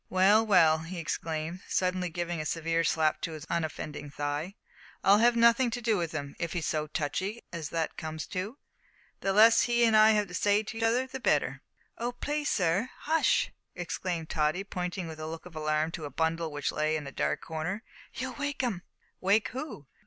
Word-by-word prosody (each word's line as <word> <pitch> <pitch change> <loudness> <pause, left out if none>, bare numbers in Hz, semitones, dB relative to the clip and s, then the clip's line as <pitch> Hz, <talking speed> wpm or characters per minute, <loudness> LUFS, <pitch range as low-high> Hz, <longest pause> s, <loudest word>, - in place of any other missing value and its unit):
"Well, 195 +4 +5
well," 165 -7 +5
he 165 +3 -7
exclaimed, 160 +1 -3
suddenly 185 -1 0
giving 175 0 -3
a - - -5
severe 165 +1 0
slap 155 -1 +1
to 165 - -3
his 155 -1 -8
unoffending 155 -3 -3
thigh, 145 +6 -3 0.5
"I'll 200 +2 +6
have 240 +1 +5
nothing 235 +2 +5
to 240 +1 -3
do 225 -2 +1
with 170 -4 -1
him. 145 -3 -5
If 170 -2 -2
he's 170 -3 -2
so 155 -1 -1
touchy 185 +9 -3
as 160 -3 -4
that 165 -1 -2
comes 160 -1 -5
to, 205 +7 -4 0.6
the 195 - 0
less 225 +4 +6
that - - -3
he 235 0 +5
and 225 -1 +4
I 215 0 +7
have 210 -1 +1
to - - -10
say 205 +4 +2
to 225 +2 -7
each - - -4
other 235 +3 +3
the 260 0 -7
better." - - +1 0.4
"Oh! 240 +1 -2
please, 295 +4 -2
sir, 190 +6 +1
hush!" 320 +1 +2 0.2
exclaimed 175 -2 -3
Tottie, 155 +4 +1
pointing 180 -2 -4
with 160 -1 -8
a 155 - -4
look 165 +1 -7
of 180 -2 -12
alarm 155 +1 0
to 160 -2 -5
a - - -5
bundle 160 +3 -1
which 145 -1 -2
lay 155 +1 0
in 150 - -6
a 140 - -6
dark 75 - -1
corner, 165 +7 -4 0.3
"you'll 260 0 -4
wake 285 0 -3
'im." 215 -8 -1 0.4
"Wake 200 +3 +2
who?" 260 - -6
175 Hz, 205 wpm, -29 LUFS, 155-220 Hz, 0.6 s, I